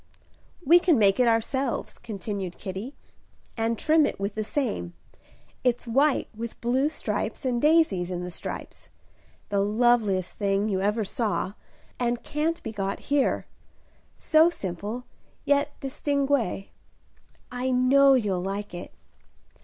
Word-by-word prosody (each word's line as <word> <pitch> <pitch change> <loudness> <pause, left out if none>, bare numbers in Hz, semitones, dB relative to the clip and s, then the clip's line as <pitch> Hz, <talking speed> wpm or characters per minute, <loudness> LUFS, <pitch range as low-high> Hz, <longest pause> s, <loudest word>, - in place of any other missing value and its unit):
"We 340 +5 +7
can 345 -5 +3
make 200 0 +4
it 250 - +4
ourselves," 235 +3 0
continued 200 -4 -5
Kitty, 200 +8 -6 0.6
"and 225 0 0
trim 310 +2 +4
it - - -5
with 200 +1 -2
the 215 - -2
same. 210 - -2 0.7
It's 245 -1 +1
white 275 +5 +2
with 230 +1 -6
blue 260 +5 +1
stripes 315 - -3
and 245 -2 0
daisies 300 - +3
in 180 -1 -3
the 180 - -5
stripes; - - -7 0.6
the 200 -1 +1
loveliest 210 -3 +2
thing 200 0 +1
you 190 -3 0
ever 210 +3 +1
saw, 205 -2 -2 0.5
and 240 -1 -1
can't 315 +3 -2
be - - -4
got 195 -2 -3
here. 285 -2 +2 0.7
So 315 +2 +4
simple, 205 - -5 0.4
yet 285 +1 +1
distingué, 275 -6 -1 0.8
I 250 +1 -2
know 265 +2 +5
you'll 200 -7 0
like 200 +2 -4
it. 175 - -7
230 Hz, 130 wpm, -26 LUFS, 200-275 Hz, 0.8 s, We